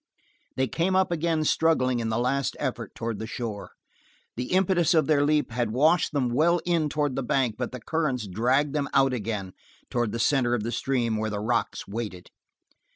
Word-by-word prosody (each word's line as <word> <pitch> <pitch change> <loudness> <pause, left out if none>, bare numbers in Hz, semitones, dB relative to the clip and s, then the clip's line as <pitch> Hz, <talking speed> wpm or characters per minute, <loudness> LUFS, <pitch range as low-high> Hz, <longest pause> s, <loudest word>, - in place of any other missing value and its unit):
They 130 0 +1
came 180 +6 0
up 190 -1 +2
again 165 -1 0
struggling 140 -6 +2
in 115 -1 -2
the 110 - 0
last 130 +2 0
effort - - -4
toward 115 -2 -4
the 110 - -5
shore. 115 -4 -5 0.6
The 125 - -3
impetus 180 -2 +3
of 160 - +4
their 150 -2 +3
leap 150 -2 +1
had 120 -1 -1
washed 155 +6 +3
them 140 -5 0
well 165 +8 +3
in 165 -4 +1
toward 145 -3 -1
the - - -1
bank, 125 -2 +1
but 125 +1 -4
the 125 - -6
currents 135 -3 -1
dragged 125 +9 +1
them 145 -2 -1
out 135 -1 +4
again 105 -5 -3 0.4
toward 120 -3 0
the 115 - -3
center 120 0 +2
of 110 - -3
the 115 - -3
stream 120 -2 0
where 110 0 -1
the 105 -1 -3
rocks 115 +2 -1
waited. 100 -4 -6
130 Hz, 195 wpm, -26 LUFS, 115-155 Hz, 0.6 s, of